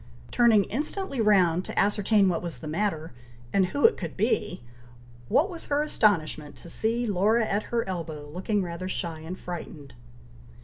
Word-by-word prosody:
Turning 225 Hz, -4 st, +5 dB
instantly 290 Hz, -, -2 dB
round 185 Hz, -5 st, +4 dB
to -, -, -8 dB
ascertain 205 Hz, 0 st, +3 dB
what 175 Hz, -3 st, 0 dB
was 170 Hz, -2 st, -5 dB
the 155 Hz, -, -8 dB
matter, 160 Hz, -2 st, -2 dB, 0.4 s
and 190 Hz, -2 st, +3 dB
who 285 Hz, +10 st, +1 dB
it 460 Hz, -, +5 dB
could -, -, -6 dB
be, 185 Hz, -, 0 dB, 0.6 s
what 315 Hz, -, +3 dB
was 345 Hz, -4 st, -9 dB
her 290 Hz, +1 st, +1 dB
astonishment 155 Hz, -, 0 dB
to 170 Hz, -, -10 dB
see 230 Hz, +5 st, 0 dB
Laura 215 Hz, +3 st, +2 dB
at 205 Hz, 0 st, 0 dB
her 235 Hz, -3 st, -1 dB
elbow, 160 Hz, -5 st, -5 dB
looking 190 Hz, +6 st, -1 dB
rather 175 Hz, +1 st, -5 dB
shy 170 Hz, -4 st, -4 dB
and 165 Hz, +4 st, -7 dB
frightened. 160 Hz, -7 st, -8 dB
190 Hz, 165 wpm, -27 LUFS, 170-225 Hz, 0.6 s, Turning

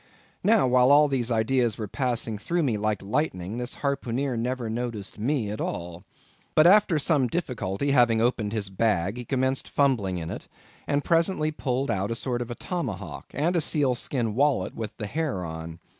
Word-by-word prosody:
Now, 220 Hz, -4 st, +4 dB
while 125 Hz, 0 st, +4 dB
all 145 Hz, +1 st, +7 dB
these 130 Hz, -4 st, -1 dB
ideas 115 Hz, 0 st, +1 dB
were 110 Hz, -, -4 dB
passing 120 Hz, -2 st, -1 dB
through 170 Hz, +10 st, -1 dB
me 125 Hz, -6 st, +1 dB
like 105 Hz, -1 st, -1 dB
lightning, 100 Hz, -, -2 dB
this 125 Hz, 0 st, -3 dB
harpooneer 135 Hz, -1 st, -1 dB
never 120 Hz, +1 st, -2 dB
noticed 110 Hz, -3 st, -4 dB
me 120 Hz, -2 st, 0 dB
at 105 Hz, -, -4 dB
all. 85 Hz, 0 st, -4 dB, 0.5 s
But, 155 Hz, -, +6 dB
after 190 Hz, -2 st, +6 dB
some 145 Hz, -3 st, +2 dB
difficulty 125 Hz, -, -2 dB
having 120 Hz, -4 st, +4 dB
opened 115 Hz, -3 st, +1 dB
his 105 Hz, -3 st, -3 dB
bag, 100 Hz, 0 st, 0 dB
he 125 Hz, -, -6 dB
commenced 130 Hz, 0 st, 0 dB
fumbling 115 Hz, -10 st, +1 dB
in 80 Hz, -1 st, -5 dB
it, -, -, -7 dB, 0.4 s
and 145 Hz, 0 st, +1 dB
presently 165 Hz, -2 st, +2 dB
pulled 135 Hz, -2 st, -1 dB
out 95 Hz, +1 st, -1 dB
a 115 Hz, -, -2 dB
sort 120 Hz, 0 st, -2 dB
of 120 Hz, -, -3 dB
tomahawk, 115 Hz, -, -5 dB
and 165 Hz, +5 st, +1 dB
a 170 Hz, -, +3 dB
seal 145 Hz, -4 st, +2 dB
skin 120 Hz, -2 st, -2 dB
wallet 140 Hz, +4 st, +1 dB
with 110 Hz, -2 st, -6 dB
the 110 Hz, -, -4 dB
hair 135 Hz, -, -2 dB
on. 80 Hz, 0 st, -7 dB
125 Hz, 180 wpm, -26 LUFS, 105-140 Hz, 0.5 s, all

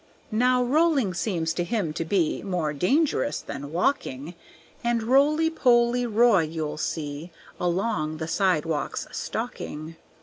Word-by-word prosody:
Now 250 Hz, +3 st, +3 dB
rolling 280 Hz, -, +2 dB
seems 170 Hz, -3 st, -1 dB
to 175 Hz, -, -1 dB
him 190 Hz, -5 st, -2 dB
to 165 Hz, -, -2 dB
be 165 Hz, -1 st, 0 dB
More 175 Hz, -6 st, -2 dB
dangerous 280 Hz, -, +1 dB
than 140 Hz, +1 st, -7 dB
walking. 165 Hz, -, -1 dB, 0.5 s
And 235 Hz, -1 st, +1 dB
Roly 295 Hz, +6 st, +3 dB
Poly 245 Hz, -4 st, +3 dB
Roy 225 Hz, -3 st, +4 dB
you'll 155 Hz, -1 st, -4 dB
see 150 Hz, +1 st, -4 dB, 0.3 s
Along 175 Hz, -3 st, -1 dB
the 160 Hz, 0 st, -4 dB
sidewalks 165 Hz, -4 st, 0 dB
stalking. 155 Hz, +2 st, -5 dB
185 Hz, 125 wpm, -25 LUFS, 160-245 Hz, 0.5 s, Roy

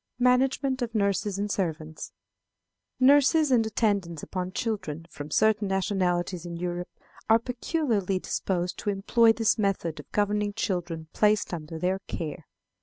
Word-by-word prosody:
Management 260 Hz, +2 st, +2 dB
of 235 Hz, -1 st, -3 dB
Nurses 200 Hz, -1 st, +1 dB
and 205 Hz, +1 st, -2 dB
Servants. 160 Hz, -5 st, -3 dB, 0.9 s
Nurses 285 Hz, +3 st, +5 dB
and 240 Hz, -3 st, +5 dB
attendants 200 Hz, -7 st, 0 dB
upon 185 Hz, -1 st, -4 dB
children 190 Hz, -8 st, -3 dB
from 145 Hz, +1 st, -8 dB
certain 215 Hz, +4 st, +2 dB
nationalities 185 Hz, -2 st, 0 dB
in 170 Hz, -1 st, -6 dB
Europe 175 Hz, +1 st, -3 dB, 0.4 s
are 225 Hz, -, +7 dB
peculiarly 235 Hz, -, -1 dB
disposed 180 Hz, -1 st, -2 dB
to -, -, -2 dB
employ 225 Hz, +4 st, +4 dB
this 225 Hz, 0 st, +1 dB
method 190 Hz, -6 st, -1 dB
of -, -, -12 dB
governing 205 Hz, 0 st, 0 dB
children 175 Hz, -6 st, -3 dB
placed 210 Hz, -2 st, +2 dB
under 160 Hz, -1 st, -5 dB
their 185 Hz, +3 st, 0 dB
care. 155 Hz, -2 st, -5 dB
200 Hz, 135 wpm, -27 LUFS, 175-225 Hz, 0.9 s, are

